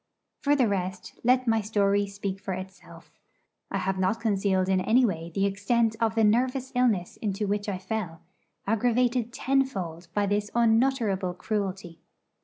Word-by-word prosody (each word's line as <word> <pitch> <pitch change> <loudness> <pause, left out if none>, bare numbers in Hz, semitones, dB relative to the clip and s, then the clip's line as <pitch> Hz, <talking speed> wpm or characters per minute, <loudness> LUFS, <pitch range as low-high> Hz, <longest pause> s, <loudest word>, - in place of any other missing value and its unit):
For 290 0 +2
the 255 -5 +3
rest, 185 -2 -4
let 255 +1 +3
my 225 -1 +3
story 205 -1 +1
speak 195 -1 -5
for 190 - -3
itself. 190 +1 -11 0.6
I 195 - -2
have 190 0 -1
not 190 +4 +1
concealed 195 -4 +1
in 190 -1 +2
any 245 +6 +4
way 170 -5 -3
the 195 - +2
extent 220 +3 +1
of 225 -1 +1
the 225 - +3
nervous 255 +4 +1
illness 230 -8 +1
into 205 -1 -2
which 205 +1 -1
I 195 - -2
fell, 185 -4 -4 0.4
aggravated 240 +2 +1
tenfold 240 -12 -1
by 205 -1 +2
this 205 +1 -1
unutterable 225 -6 +2
cruelty. 190 -4 -4
205 Hz, 155 wpm, -27 LUFS, 190-235 Hz, 0.6 s, any